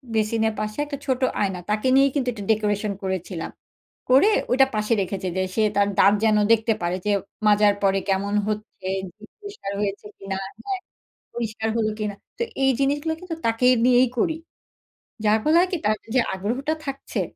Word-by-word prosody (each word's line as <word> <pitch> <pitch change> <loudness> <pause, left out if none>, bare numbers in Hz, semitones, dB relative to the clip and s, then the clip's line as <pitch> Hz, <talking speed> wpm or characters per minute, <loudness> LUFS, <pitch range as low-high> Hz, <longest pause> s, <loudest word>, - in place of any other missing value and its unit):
বেসিনের 220 0 +1
পাশে 215 +2 -4
একটা 285 -1 -5
ছোট 260 -1 0 0.2
আয়না। 190 -3 -1
তাকে 215 +4 0
নিয়েই 275 0 +5
কিন্তু 255 -3 0
এটা 205 -3 -7
ডেকোরেশন 210 -1 0
করেছিলাম। 185 -2 -4 0.6
করে 275 +12 +6 0.2
ওইটা 265 +1 +5
পাশে 215 +2 +1
রেখেছে 190 0 -3
যে - - +2
সে 220 - +2
তার 200 0 +3
দাঁত 200 - +6
যেন 215 -1 +4
দেখতে 225 0 +3
পারে 175 +1 -1
যে 210 - +2 0.4
মাজার 205 0 +5
পরে 195 0 +3
কেমন 200 +1 0
হচ্ছে? 215 +1 -3 0.2
যে - - 0 0.3
জিভ 215 +1 -15
পরিষ্কার 405 - -7
হয়েছে 200 0 -3
কিনা 195 -1 -4 0.3
হ্যাঁ, 390 -2 -2 0.6
পরিষ্কার 225 -1 -3
হলো 215 -1 +1
কিনা? 210 -1 -2 0.2
তো - - -1 0.2
এই 270 - +5
জিনিসগুলো 290 +4 +1
কিন্তু 350 -3 -6
তাকে 230 +2 +2 0.2
নিয়েই 250 0 +5
করি। 320 +3 +1 0.9
যার 210 +1 +5
ফলে 310 +2 +3
হয় 365 +1 +3
কি? 360 - 0
তার 215 +1 +3 0.2
যে 255 - +5
আগ্রহটা 245 +11 -2
থাকছে 275 0 -4
215 Hz, 175 wpm, -23 LUFS, 205-265 Hz, 0.9 s, করে